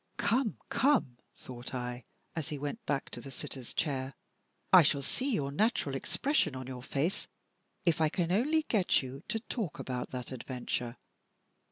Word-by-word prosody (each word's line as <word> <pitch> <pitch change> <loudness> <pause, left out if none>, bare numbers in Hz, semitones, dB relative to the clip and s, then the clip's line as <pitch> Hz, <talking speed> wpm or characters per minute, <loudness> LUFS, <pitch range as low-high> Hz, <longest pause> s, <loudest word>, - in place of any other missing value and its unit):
"Come! 225 +3 +2
come!" 235 - +3 0.2
thought 125 0 -7
I, 125 0 -4 0.3
as 160 -4 -2
he 150 - -3
went 145 - -4
back 140 -2 0
to 120 - -6
the 135 - -8
sitter's 130 -1 -6
chair, 135 -3 -1 0.6
"I 185 - +12
shall 140 -2 +3
see 260 - 0
your 140 - 0
natural 180 - +2
expression 155 - +1
on 130 0 -5
your 125 -1 -6
face 145 +8 -1 0.6
if 165 -2 +3
I 155 - +5
can 170 +1 0
only 300 +11 +3
get 205 - +3
you 130 +2 -6
to 225 +1 0
talk 220 - -3
about 125 -1 -3
that 125 -1 -5
adventure." 125 -1 -3
140 Hz, 165 wpm, -32 LUFS, 130-205 Hz, 0.6 s, I